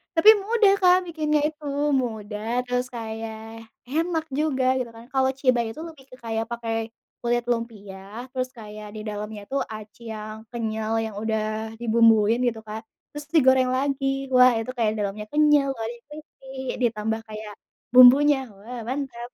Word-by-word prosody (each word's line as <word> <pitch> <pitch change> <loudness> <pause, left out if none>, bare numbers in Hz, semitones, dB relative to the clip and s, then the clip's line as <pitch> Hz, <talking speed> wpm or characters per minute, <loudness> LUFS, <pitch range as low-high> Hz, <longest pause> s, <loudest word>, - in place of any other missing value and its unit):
.Tapi 405 +7 +7
mudah, 415 0 +3
Kak, 360 0 +6
bikinnya 305 -2 0
itu, 305 -1 -9 0.3
mudah 220 -1 -2
terus 250 0 -1
kayak 225 -1 -7 0.2
enak 320 +3 -1
juga 265 -3 +1
gitu 240 -2 -3
kan. 230 0 -13
Kalau 265 -1 +3
cibay 245 -4 +2
itu 310 - -9
lebih 310 -5 -13
ke 255 - -10
kayak 225 -1 -3
pakai 230 -1 -3 0.5
kulit 240 0 +1
lumpia, 215 -1 -6
terus 255 -1 -2
kayak 215 -3 -10
di 215 - -5
dalamnya 210 0 -5
itu 270 - -5 0.2
aci 215 +1 -10
yang 215 0 -6 0.2
kenyal 220 -1 -2
yang 220 -2 -7
udah 220 0 -2
dibumbuin 225 -1 +4
gitu, 230 -2 -1
Kak, 220 +1 -5 0.3
terus 295 0 -7
digoreng 260 -3 +5
lagi. 275 +1 0 0.3
Wah, 250 0 +7
itu 240 +3 -4
kayak 220 -2 +1
dalemnya 205 +1 -3
kenyal, 295 -2 +4
luatnya 235 -2 -5
crispy, 300 -3 -13 0.3
ditambah 220 -1 0
kayak 215 -1 -7 0.4
bumbunya, 270 +3 +8 0.2
wah 235 +4 -8
mantap. 250 -3 -4
235 Hz, 150 wpm, -24 LUFS, 220-270 Hz, 0.5 s, bumbunya